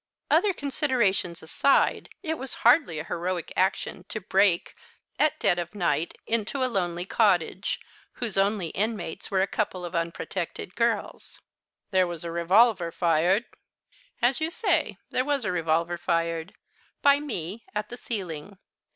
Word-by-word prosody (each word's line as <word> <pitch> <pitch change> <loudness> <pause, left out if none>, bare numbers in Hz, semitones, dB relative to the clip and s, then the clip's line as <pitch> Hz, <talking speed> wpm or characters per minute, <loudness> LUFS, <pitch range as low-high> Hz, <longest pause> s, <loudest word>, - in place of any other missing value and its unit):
"Other 415 - +5
considerations 255 - 0
aside, 270 +12 +2
it 320 -2 -2
was 265 0 -5
hardly 240 - +5
a 155 - -3
heroic 175 +1 -3
action 190 -1 0
to 215 - -4
break, 190 -2 +2 0.4
at 305 +1 +2
dead 175 - +2
of 175 +4 -5
night, 170 -4 0
into 230 +4 0
a - - +4
lonely 180 -7 -1
cottage, 190 -3 +1 0.3
whose 235 -4 -4
only 195 -3 +1
inmates 200 -3 -3
were 190 -1 +2
a - - +3
couple 190 -3 -2
of 175 - -7
unprotected 170 +2 -3
girls." 230 -3 -1 0.5
"There 185 -2 +4
was 170 -2 -6
a 170 - -4
revolver 180 +2 +4
fired." 175 +6 +2 0.8
"As 255 +5 +3
you 315 - +1
say, 335 - 0
there 255 - +2
was 280 -3 0
a 210 - 0
revolver 170 0 0
fired 165 +1 -1 0.5
by 285 0 +6
me, 220 - -5
at 210 0 -2
the 245 - -7
ceiling. 190 -5 -5
195 Hz, 145 wpm, -27 LUFS, 170-235 Hz, 0.8 s, by